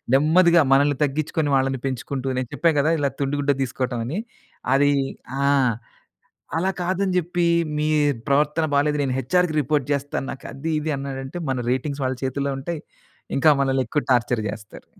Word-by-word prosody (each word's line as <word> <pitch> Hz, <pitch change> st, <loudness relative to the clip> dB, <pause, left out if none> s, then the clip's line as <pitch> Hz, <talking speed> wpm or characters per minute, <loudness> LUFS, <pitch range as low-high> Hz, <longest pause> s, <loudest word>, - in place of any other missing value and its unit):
నెమ్మదిగా 170 Hz, +4 st, +5 dB
మనల్ని 145 Hz, 0 st, +3 dB
తగ్గించుకుని 150 Hz, +1 st, -1 dB
వాళ్ళని 135 Hz, -1 st, 0 dB
పెంచుకుంటూ 130 Hz, +1 st, -4 dB
నేను 125 Hz, -, -4 dB
చెప్పా 165 Hz, -1 st, +3 dB
గదా! 155 Hz, +3 st, +2 dB
ఇలా 140 Hz, -1 st, 0 dB
తుండి 140 Hz, +1 st, 0 dB
గుడ్డ 145 Hz, 0 st, +2 dB
దీసుకోటం 125 Hz, -1 st, -3 dB
అని 165 Hz, -, -2 dB, 0.6 s
అది 145 Hz, +1 st, +4 dB, 0.5 s
ఆ! -, -, +3 dB, 1.1 s
అలా 185 Hz, +3 st, +1 dB
కాదని 185 Hz, +2 st, 0 dB
జెప్పి 175 Hz, 0 st, 0 dB, 0.3 s
మీ 150 Hz, +1 st, 0 dB, 0.4 s
ప్రవర్తన 150 Hz, +3 st, +2 dB
బాలేదు 150 Hz, +1 st, +2 dB
నేను 130 Hz, -2 st, -1 dB
హెచ్ఆర్‌కి 170 Hz, +5 st, +1 dB
రిపోర్ట్ 145 Hz, 0 st, 0 dB
జేస్తాను. 140 Hz, -1 st, -3 dB
నాకది 140 Hz, +4 st, -5 dB
ఇది 155 Hz, +1 st, -2 dB
అన్నాడంటే 135 Hz, +2 st, -6 dB
మన 130 Hz, -, 0 dB
రేటింగ్స్ 140 Hz, +2 st, -2 dB
వాళ్ళ 130 Hz, 0 st, -1 dB
చేతుల్లో 140 Hz, +1 st, -1 dB
ఉంటాయి. 160 Hz, +3 st, -5 dB, 0.5 s
ఇంకా 155 Hz, +3 st, +5 dB
మనల్ని 135 Hz, -1 st, +1 dB
ఎక్కువ 145 Hz, +5 st, -1 dB
టార్చర్ 120 Hz, -1 st, +2 dB
జేస్తారు. 105 Hz, 0 st, -8 dB
140 Hz, 150 wpm, -23 LUFS, 135-155 Hz, 1.1 s, నెమ్మదిగా